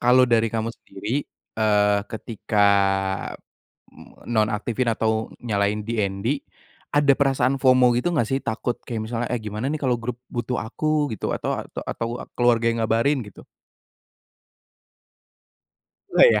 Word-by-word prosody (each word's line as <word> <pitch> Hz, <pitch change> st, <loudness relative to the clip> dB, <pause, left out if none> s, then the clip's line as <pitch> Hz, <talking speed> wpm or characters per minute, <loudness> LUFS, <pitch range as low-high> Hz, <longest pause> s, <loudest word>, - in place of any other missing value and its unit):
kalau 125 Hz, +1 st, +6 dB
dari 115 Hz, -1 st, +3 dB
kamu 115 Hz, 0 st, -1 dB
sendiri 115 Hz, +9 st, -4 dB, 0.3 s
eee, 105 Hz, -2 st, +3 dB
ketika 110 Hz, -2 st, 0 dB, 1.3 s
m -, -, -16 dB
nonaktifin 110 Hz, +2 st, 0 dB
atau 110 Hz, 0 st, 0 dB, 0.2 s
nyalain 105 Hz, -1 st, 0 dB
DND 110 Hz, +4 st, -1 dB, 0.6 s
ada 145 Hz, -1 st, +5 dB
perasaan 135 Hz, -1 st, +2 dB
FOMO 130 Hz, -2 st, +5 dB
gitu 125 Hz, -, +1 dB
enggak 120 Hz, -9 st, +1 dB
sih 135 Hz, -, +1 dB
takut 120 Hz, +1 st, -2 dB
kayak 115 Hz, -3 st, -3 dB
misalnya, 115 Hz, +1 st, -3 dB
eh 120 Hz, -, -1 dB
gimana 105 Hz, +3 st, -4 dB
nih -, -, 0 dB
kalau 125 Hz, -2 st, +2 dB
grup 120 Hz, +1 st, -4 dB, 0.2 s
butuh 120 Hz, +1 st, -2 dB
aku 150 Hz, +5 st, 0 dB
gitu -, -, -3 dB
atau -, -, -2 dB
ata -, -, -7 dB
atau 115 Hz, +1 st, -4 dB
keluarga 120 Hz, -1 st, +3 dB
yang 115 Hz, -, -2 dB
ngabarin 120 Hz, +5 st, +2 dB
gitu? 105 Hz, -, -13 dB, 2.7 s
Nggak -, -, +8 dB
ya? 105 Hz, -, +2 dB
115 Hz, 135 wpm, -23 LUFS, 110-125 Hz, 2.7 s, Nggak